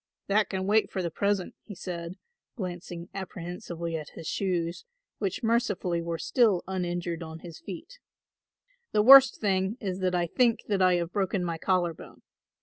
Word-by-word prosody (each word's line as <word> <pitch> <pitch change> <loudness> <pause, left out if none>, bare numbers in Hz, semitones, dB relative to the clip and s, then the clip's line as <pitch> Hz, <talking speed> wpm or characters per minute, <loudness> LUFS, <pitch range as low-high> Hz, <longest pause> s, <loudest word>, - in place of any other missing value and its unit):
"That 210 +2 +2
can 190 -1 -2
wait 215 +2 +3
for 190 - -2
the 170 - -2
present," 200 +1 0
he 205 - -10
said, 170 -1 -6 0.4
glancing 175 -4 -6
apprehensively 175 -2 -5
at 155 -2 -5
his - - -8
shoes, 175 -2 -1 0.4
which 195 +1 -2
mercifully 210 -7 +1
were 165 0 -3
still 215 -2 +2
uninjured 175 -2 -2
on 160 0 -8
his 170 -3 -10
feet; 205 - -9 0.9
"the 210 - +4
worst 270 +2 +9
thing 195 +1 0
is 190 -3 -3
that 185 -1 0
I 175 -1 +2
think 235 +6 +2
that 200 -2 +1
I 185 -1 +5
have 175 0 -2
broken 195 -2 0
my 165 -1 -3
collar 180 -2 +1
bone. - - -14
185 Hz, 165 wpm, -28 LUFS, 170-205 Hz, 0.9 s, worst